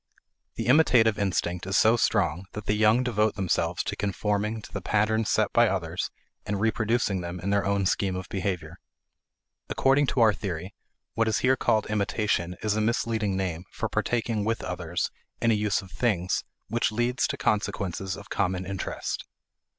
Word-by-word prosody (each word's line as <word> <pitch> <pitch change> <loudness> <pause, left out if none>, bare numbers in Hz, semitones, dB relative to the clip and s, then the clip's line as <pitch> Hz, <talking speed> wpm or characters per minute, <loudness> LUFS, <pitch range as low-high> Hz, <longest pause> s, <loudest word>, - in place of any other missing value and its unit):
The - - -3
imitative 120 -6 +5
instinct 90 -2 -1
is 95 - +1
so 110 +2 +5
strong 95 -6 +1
that 105 -1 -6
the - - +1
young 110 +3 +4
devote 110 -3 +1
themselves 90 -3 0
to - - -3
conforming 105 +2 -1
to - - -12
the - - -3
patterns 110 +1 +1
set - - +2
by - - +5
others - - -2 0.3
and 100 -1 -2
reproducing 110 -2 +1
them 85 +1 -5
in 95 +3 -2
their 100 0 +2
own 100 -1 +1
scheme 95 0 +1
of 95 0 -5
behavior. 90 -4 -3 0.9
According 135 +1 +3
to 130 - 0
our 110 -2 +6
theory, 95 -2 -5 0.4
what 115 0 +1
is 110 - +2
here 130 +1 +5
called 110 -3 +1
imitation 100 -4 0
is 105 -1 +1
a 110 - +1
misleading 110 -3 0
name 90 -2 -3
for - - -3
partaking 115 -3 0
with 110 +1 -1
others 90 -1 -3 0.3
in 115 - +3
a - - +4
use 105 -1 +1
of 95 - -14
things 95 -3 0 0.2
which 120 0 0
leads 120 +3 +1
to - - -3
consequences 95 -2 -1
of 100 - -11
common 95 -1 0
interest. 95 -1 -4
105 Hz, 175 wpm, -27 LUFS, 95-110 Hz, 0.9 s, our